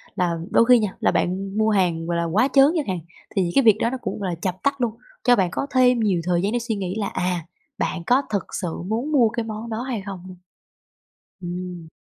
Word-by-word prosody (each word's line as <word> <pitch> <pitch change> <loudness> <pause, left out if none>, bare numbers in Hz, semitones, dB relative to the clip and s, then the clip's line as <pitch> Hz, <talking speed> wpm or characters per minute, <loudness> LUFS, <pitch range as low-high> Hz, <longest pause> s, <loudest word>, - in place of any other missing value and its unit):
là 175 -4 0
đôi 230 - +5
khi 250 0 +6
nha 210 -4 -2
là - - +2
bạn 195 +3 -1
mua 220 0 +3
hàng, 180 -5 +1
gọi 170 0 0
là, 170 - 0
quá 200 +10 +2
trớn 275 -1 +7
chẳng 300 - -1
hạn, 185 -2 -1 0.4
thì 195 - +3
những 170 - -1
cái 275 - +5
việc 220 -3 +6
đó 230 - +1
nó 260 - -3
cũng, - - -4
gọi 195 -2 -2
là, 170 - -3
chập 185 -1 -3
tắt 280 -1 0
luôn, 240 -2 +1 0.3
cho 245 -1 +5
bạn 185 -4 +1
có 275 - -2
thêm 250 -2 +5
nhiều 195 -6 +1
thời 175 -1 +1
gian 200 +3 0
để 240 - 0
suy 230 -1 -2
nghĩ 190 -2 -3
là, 200 - -1
à, 180 -3 -2 0.3
bạn 170 - -2
có 255 +3 +4
thực 200 -2 -1 0.2
sự 175 -3 -4
muốn 235 +8 -2
mua 245 -6 +4
cái 235 0 -3
món 220 +1 -6
đó 220 +1 -3
hay 250 -4 -3
không. 195 -2 -6 1.2
Ừm. 175 -1 -6
205 Hz, 250 wpm, -23 LUFS, 180-235 Hz, 1.2 s, trớn